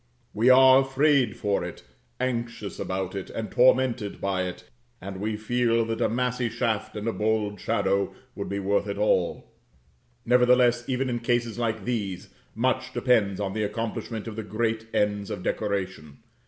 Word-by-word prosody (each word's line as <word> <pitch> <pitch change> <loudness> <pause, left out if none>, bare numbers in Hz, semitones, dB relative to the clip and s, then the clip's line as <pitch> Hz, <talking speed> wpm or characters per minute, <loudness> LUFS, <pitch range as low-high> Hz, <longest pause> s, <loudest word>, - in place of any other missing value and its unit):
We 115 +5 +3
are 130 +1 +8
afraid 135 -3 +2
for 100 -3 0
it, 90 - -7 0.4
anxious 115 -4 -3
about 95 0 -3
it, 95 -2 -5
and 110 - -5
tormented 125 -4 +3
by 95 -1 -1
it; 90 - -8 0.4
and 95 +1 -7
we 105 0 -2
feel 115 +1 +1
that 115 0 -3
a - - +2
massy 125 +1 -1
shaft 115 -2 -2
and 105 +1 -4
a 115 - 0
bold 105 -2 -1
shadow 100 0 0 0.2
would - - -5
be 100 - -2
worth 100 +1 0
it 100 0 -3
all. 95 -4 0 0.7
Nevertheless, 125 0 +4
even 130 +1 0
in 120 -1 -1
cases 120 -1 -1
like 110 -4 -2
these, 105 -7 -3 0.3
much 130 +3 0
depends 105 -6 +2
on 100 -2 -2
the 110 - -2
accomplishment 110 +1 -3
of 110 - -6
the 110 - -3
great 110 +1 -2
ends 105 -1 0
of 90 - -5
decoration. 95 -8 -3
110 Hz, 165 wpm, -26 LUFS, 100-120 Hz, 0.7 s, are